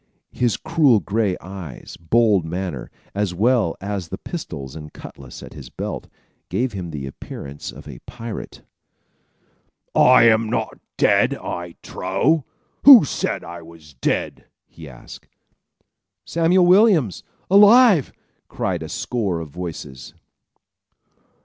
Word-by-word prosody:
His 120 Hz, -3 st, 0 dB
cruel 155 Hz, -8 st, +3 dB
gray 100 Hz, -2 st, -1 dB
eyes, 90 Hz, -7 st, -9 dB
bold 105 Hz, +1 st, +2 dB
manner, 85 Hz, -4 st, -5 dB, 0.2 s
as 100 Hz, -3 st, -2 dB
well 110 Hz, -3 st, +2 dB
as 100 Hz, -2 st, -4 dB
the 95 Hz, -, -6 dB
pistols 80 Hz, -, -7 dB
and 75 Hz, -1 st, -9 dB
cutlass 65 Hz, -3 st, -12 dB
at -, -, -11 dB
his 65 Hz, -4 st, -11 dB
belt, -, -, -6 dB, 0.4 s
gave 125 Hz, -1 st, -1 dB
him 90 Hz, -3 st, -5 dB
the 75 Hz, -4 st, -6 dB
appearance 70 Hz, +1 st, -8 dB
of 70 Hz, +5 st, -13 dB
a 65 Hz, -5 st, -10 dB
pirate. 115 Hz, -2 st, -8 dB, 1.3 s
"I 125 Hz, -2 st, +6 dB
am 110 Hz, -1 st, +4 dB
not -, -, -3 dB, 0.2 s
dead, -, -, +3 dB
I 85 Hz, -1 st, -6 dB
trow! 130 Hz, -, 0 dB, 0.4 s
Who 260 Hz, -, +10 dB
said -, -, -3 dB
I 85 Hz, +1 st, -9 dB
was 80 Hz, -2 st, -15 dB
dead?" 60 Hz, -, -2 dB, 0.2 s
he 80 Hz, -3 st, -13 dB
asked. 65 Hz, -, -13 dB, 1.0 s
"Samuel 170 Hz, +2 st, +2 dB
Williams! 180 Hz, -, +4 dB, 0.3 s
Alive!" 205 Hz, -, +6 dB, 0.4 s
cried -, -, -3 dB
a -, -, -7 dB
score 100 Hz, -9 st, -2 dB
of 80 Hz, -2 st, -7 dB
voices. 80 Hz, -6 st, -8 dB
95 Hz, 125 wpm, -21 LUFS, 80-125 Hz, 1.3 s, Who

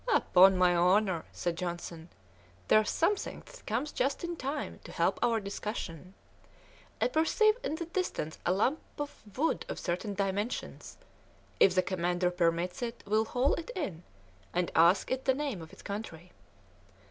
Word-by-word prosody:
"Upon 190 Hz, -, +6 dB
my 180 Hz, -1 st, +4 dB
honour," 180 Hz, 0 st, +3 dB
said 175 Hz, -1 st, -2 dB
Johnson, 170 Hz, -1 st, -5 dB, 0.6 s
"there's 215 Hz, -1 st, +5 dB
something 395 Hz, +5 st, 0 dB
that -, -, -14 dB
comes 250 Hz, +8 st, -1 dB
just 275 Hz, +5 st, -1 dB
in 345 Hz, 0 st, -3 dB
time 285 Hz, 0 st, -4 dB
to -, -, -10 dB
help -, -, +1 dB
our 230 Hz, -2 st, +3 dB
discussion. 195 Hz, -3 st, -6 dB, 0.8 s
I -, -, +3 dB
perceive 430 Hz, +3 st, +3 dB
in 315 Hz, -, -1 dB
the 335 Hz, +1 st, -4 dB
distance 335 Hz, -, -3 dB
a 175 Hz, -, +2 dB
lump 235 Hz, +11 st, +2 dB, 0.2 s
of 290 Hz, -1 st, -6 dB, 0.2 s
wood 320 Hz, +4 st, +1 dB
of -, -, -4 dB
certain 195 Hz, +4 st, -3 dB
dimensions; 200 Hz, +4 st, -3 dB, 0.6 s
if 190 Hz, -, +6 dB
the 185 Hz, -, +4 dB
commander 180 Hz, -1 st, 0 dB
permits 175 Hz, +1 st, 0 dB
it 235 Hz, -1 st, -4 dB
we'll 215 Hz, +2 st, +2 dB
haul 250 Hz, +5 st, +1 dB
it 335 Hz, -, -4 dB
in, 195 Hz, -, -3 dB, 0.5 s
and 180 Hz, -1 st, 0 dB
ask 170 Hz, +4 st, +4 dB
it 260 Hz, 0 st, -1 dB
the 265 Hz, -1 st, +3 dB
name 275 Hz, -, -3 dB
of 160 Hz, -, -10 dB
its -, -, -14 dB
country." 180 Hz, -4 st, -6 dB
200 Hz, 160 wpm, -31 LUFS, 180-275 Hz, 0.8 s, Upon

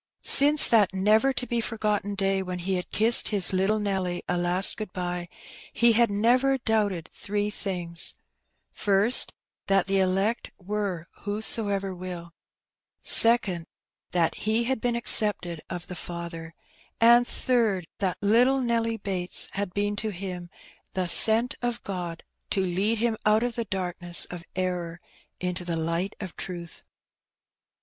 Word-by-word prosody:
Since 290 Hz, +2 st, +8 dB
that 205 Hz, -5 st, +3 dB
never 215 Hz, +7 st, +3 dB
to 255 Hz, -1 st, -3 dB
be 235 Hz, -1 st, -2 dB
forgotten 210 Hz, -3 st, -2 dB
day 195 Hz, 0 st, 0 dB
when 180 Hz, -1 st, -5 dB
he 185 Hz, +2 st, -3 dB
had 180 Hz, -1 st, -3 dB
kissed 225 Hz, +2 st, +3 dB
his 195 Hz, -3 st, +1 dB
little 195 Hz, +3 st, +1 dB
Nelly 190 Hz, -4 st, -3 dB
a 180 Hz, -, -1 dB
last 175 Hz, +2 st, 0 dB
good 215 Hz, -4 st, -7 dB
bye, 175 Hz, -1 st, -4 dB, 0.4 s
he 235 Hz, 0 st, +4 dB
had 235 Hz, +1 st, +3 dB
never 245 Hz, +6 st, +2 dB
doubted 210 Hz, -8 st, -1 dB
three 205 Hz, 0 st, -3 dB
things: 175 Hz, -5 st, -5 dB, 0.3 s
— -, -, -51 dB, 0.2 s
First, 205 Hz, +4 st, +4 dB, 0.4 s
that 195 Hz, -2 st, +2 dB
the 195 Hz, 0 st, 0 dB
elect 195 Hz, +5 st, 0 dB
were 195 Hz, -3 st, -4 dB
^' -, -, -22 dB
whoso 215 Hz, +1 st, 0 dB
ever 195 Hz, -1 st, -3 dB
wilP'; 175 Hz, -2 st, -8 dB, 0.7 s
second, 205 Hz, -8 st, +3 dB, 0.4 s
that 170 Hz, -2 st, +1 dB
he 220 Hz, +2 st, -1 dB
had 260 Hz, -1 st, -2 dB
been 240 Hz, -1 st, -1 dB
accepted 210 Hz, -8 st, +2 dB
of 175 Hz, 0 st, -6 dB
the 180 Hz, -, -9 dB
Father; 170 Hz, -1 st, -7 dB, 0.4 s
and, 240 Hz, +1 st, +5 dB
third, 225 Hz, -8 st, 0 dB
that 190 Hz, -3 st, -1 dB
little 245 Hz, +6 st, +3 dB
Nelly 230 Hz, -2 st, -1 dB
Bates 185 Hz, -4 st, 0 dB
had 200 Hz, -2 st, -4 dB
been 205 Hz, +2 st, -2 dB
to 215 Hz, +1 st, -3 dB
him 180 Hz, -2 st, -7 dB, 0.4 s
the 185 Hz, -1 st, -2 dB
"sent 225 Hz, +7 st, +6 dB
of 240 Hz, -1 st, -3 dB
God,^^ 175 Hz, -4 st, -6 dB, 0.3 s
to 195 Hz, -, 0 dB
lead 190 Hz, +5 st, -1 dB
him 225 Hz, 0 st, -1 dB
out 215 Hz, +2 st, +2 dB
of 245 Hz, -1 st, -2 dB
the 235 Hz, 0 st, -4 dB
darkness 175 Hz, -3 st, -2 dB
of 175 Hz, -1 st, -8 dB
error 180 Hz, -2 st, -3 dB, 0.4 s
into 180 Hz, 0 st, -4 dB
the 170 Hz, -2 st, -3 dB
light 170 Hz, +5 st, -3 dB
of 185 Hz, -4 st, -8 dB
truth. 175 Hz, -3 st, -8 dB
195 Hz, 155 wpm, -25 LUFS, 180-225 Hz, 0.7 s, Since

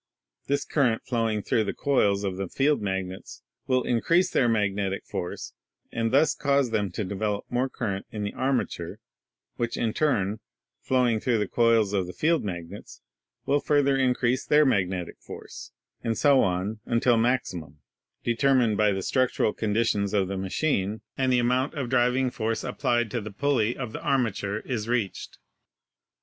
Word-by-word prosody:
This 140 Hz, +1 st, 0 dB
current 125 Hz, -7 st, +1 dB
flowing 115 Hz, -4 st, -1 dB
through 110 Hz, -, +1 dB
the 100 Hz, -, -3 dB
coils 105 Hz, -8 st, +2 dB
of 95 Hz, -2 st, -2 dB
the 95 Hz, -1 st, -3 dB
field 145 Hz, +7 st, +1 dB
magnets 95 Hz, -2 st, -4 dB, 0.2 s
will 130 Hz, -1 st, +2 dB
increase 165 Hz, -, +2 dB
their 120 Hz, -, +3 dB
magnetic 100 Hz, -3 st, 0 dB
force, 90 Hz, -, -5 dB, 0.4 s
and 115 Hz, -1 st, -1 dB
thus 145 Hz, +5 st, +4 dB
cause 140 Hz, -4 st, +1 dB
them 105 Hz, -3 st, 0 dB
to 105 Hz, -, -2 dB
develop 100 Hz, +2 st, -2 dB
more 125 Hz, +2 st, 0 dB
current 100 Hz, -7 st, -4 dB
in 105 Hz, -1 st, -5 dB
the 100 Hz, -, -3 dB
armature, 125 Hz, -9 st, -2 dB, 0.6 s
which 120 Hz, -1 st, -2 dB
in 110 Hz, -2 st, 0 dB
turn, 110 Hz, -9 st, 0 dB, 0.4 s
flowing 125 Hz, -4 st, +2 dB
through 120 Hz, 0 st, +1 dB
the 105 Hz, -2 st, 0 dB
coils 115 Hz, -3 st, +3 dB
of 95 Hz, -3 st, 0 dB
the 90 Hz, -, -7 dB
field 160 Hz, -, +1 dB
magnets, 85 Hz, -4 st, -7 dB, 0.5 s
will 145 Hz, +1 st, +2 dB
further 145 Hz, -2 st, +2 dB
increase 125 Hz, -1 st, +1 dB
their 150 Hz, 0 st, +4 dB
magnetic 95 Hz, -7 st, 0 dB
force, -, -, -10 dB, 0.3 s
and 115 Hz, -1 st, -1 dB
so 140 Hz, -3 st, +5 dB
on 95 Hz, +4 st, -1 dB
until 120 Hz, +1 st, +3 dB
maximum, 105 Hz, -, -1 dB, 0.5 s
determined 120 Hz, -3 st, +2 dB
by 105 Hz, -1 st, +3 dB
the 95 Hz, -1 st, -2 dB
structural 130 Hz, -3 st, +1 dB
conditions 105 Hz, -2 st, 0 dB
of 95 Hz, -2 st, +2 dB
the 100 Hz, -, -3 dB
machine 100 Hz, +1 st, -1 dB
and 130 Hz, -1 st, +1 dB
the 125 Hz, -, +4 dB
amount 125 Hz, +3 st, +1 dB
of 135 Hz, -5 st, -3 dB
driving 125 Hz, +1 st, +2 dB
force 115 Hz, -1 st, -2 dB
applied 120 Hz, -3 st, 0 dB
to 120 Hz, -, -2 dB
the 105 Hz, -, -6 dB
pulley 120 Hz, 0 st, 0 dB
of 125 Hz, -5 st, -5 dB
the -, -, -6 dB
armature, 110 Hz, -5 st, 0 dB
is 115 Hz, -4 st, -4 dB
reached. 120 Hz, -6 st, -2 dB
115 Hz, 160 wpm, -26 LUFS, 100-130 Hz, 0.6 s, so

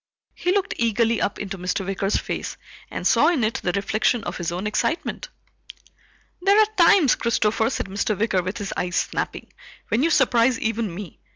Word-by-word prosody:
He 360 Hz, -, -1 dB
looked 400 Hz, +1 st, 0 dB
eagerly 230 Hz, 0 st, +1 dB
up 200 Hz, -, -1 dB
into 195 Hz, -2 st, -6 dB
Mr. 180 Hz, +2 st, -2 dB
Wicker's 195 Hz, +1 st, 0 dB
face -, -, -4 dB, 0.3 s
and -, -, -6 dB
saw -, -, +4 dB
in 320 Hz, -9 st, +2 dB
it 215 Hz, +1 st, -1 dB
the 180 Hz, -, +1 dB
reflection 215 Hz, +4 st, 0 dB
of -, -, -5 dB
his 170 Hz, -1 st, -3 dB
own 180 Hz, +4 st, -4 dB
excitement. 255 Hz, +10 st, -2 dB, 1.1 s
"There 400 Hz, +3 st, +4 dB
are 435 Hz, -, +7 dB
times, 340 Hz, -5 st, +5 dB
Christopher," 220 Hz, -1 st, +1 dB
said -, -, -3 dB
Mr. 200 Hz, +2 st, -2 dB
Wicker 205 Hz, -4 st, +1 dB
with 185 Hz, +5 st, -4 dB
his 205 Hz, -3 st, -4 dB
eyes 180 Hz, 0 st, -2 dB
snapping, -, -, -3 dB, 0.4 s
"when 230 Hz, -, +1 dB
you 325 Hz, -, +3 dB
surprise 250 Hz, -5 st, +3 dB
even 225 Hz, -2 st, -2 dB
me. 195 Hz, -3 st, -9 dB
220 Hz, 180 wpm, -23 LUFS, 195-250 Hz, 1.1 s, are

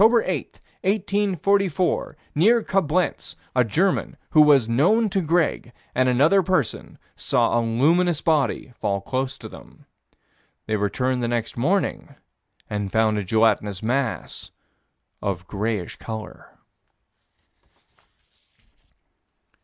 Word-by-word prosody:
8, -, -, +9 dB, 0.7 s
1844, 195 Hz, -4 st, 0 dB, 0.2 s
near 220 Hz, +9 st, +3 dB
Coblenz, 185 Hz, -2 st, -1 dB, 0.2 s
a 125 Hz, -, +4 dB
German, 165 Hz, -, 0 dB
who 155 Hz, -, +6 dB
was 140 Hz, -6 st, +5 dB
known 185 Hz, -, +2 dB
to 195 Hz, -1 st, 0 dB
Greg, 165 Hz, -6 st, 0 dB, 0.2 s
and 130 Hz, 0 st, +2 dB
another 150 Hz, +10 st, +4 dB
person 170 Hz, -, -2 dB, 0.2 s
saw 120 Hz, -, +1 dB
a -, -, +1 dB
luminous 155 Hz, +9 st, +2 dB
body 150 Hz, -5 st, 0 dB
fall 100 Hz, -1 st, -1 dB
close 130 Hz, +5 st, -3 dB
to -, -, -9 dB
them. -, -, -15 dB, 0.8 s
They 110 Hz, -, -1 dB
returned 125 Hz, +5 st, -1 dB
next 120 Hz, -1 st, -2 dB
morning 175 Hz, +11 st, -1 dB, 0.5 s
and 105 Hz, -2 st, -4 dB
found 110 Hz, -1 st, +2 dB
a -, -, -3 dB
gelatinous 105 Hz, -1 st, +1 dB
mass 125 Hz, +1 st, -2 dB, 0.7 s
of 95 Hz, -2 st, -3 dB
grayish 105 Hz, -2 st, -3 dB
color. 110 Hz, -1 st, -9 dB
130 Hz, 105 wpm, -23 LUFS, 110-180 Hz, 0.8 s, 8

